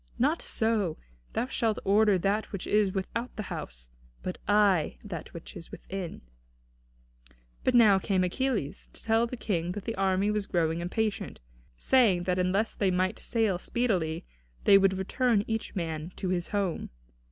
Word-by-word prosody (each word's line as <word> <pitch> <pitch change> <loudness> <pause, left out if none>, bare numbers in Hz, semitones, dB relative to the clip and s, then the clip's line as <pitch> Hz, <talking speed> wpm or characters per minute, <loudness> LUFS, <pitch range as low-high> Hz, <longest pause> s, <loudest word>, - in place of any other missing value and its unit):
"Not 290 +7 +2
so; 220 -7 0 0.4
thou 240 - 0
shalt 225 -4 0
order 205 0 +4
that 200 +4 0
which 195 - -5
is 210 -2 +3
without 215 +6 -4
the 215 - -4
house, - - -6 0.4
but 180 - -4
I 205 -6 +3
that 180 -7 -7
which 170 +3 -10
is 170 -3 -8
within." 185 -3 -6 1.4
But 255 - +2
now 210 -5 +7
came 190 -1 +1
Achilles, 210 - -2
to - - -9
tell 225 +1 +3
the 250 - -6
King 180 -6 -1
that 200 -1 -6
the 230 - -2
army 195 +1 +1
was 210 -2 -1
growing 165 -1 +1
impatient, 205 +2 -2 0.4
saying, 210 - +4
that 180 0 0
unless 195 +4 +1
they 195 - +1
might 185 +1 0
sail 220 -6 0
speedily, 185 -10 -1 0.4
they 200 - +7
would 195 -1 +5
return 215 +2 +1
each 225 -1 -3
man 165 -2 -3
to 185 - -3
his 175 -2 -1
home. 200 -5 -1
195 Hz, 160 wpm, -29 LUFS, 180-220 Hz, 1.4 s, now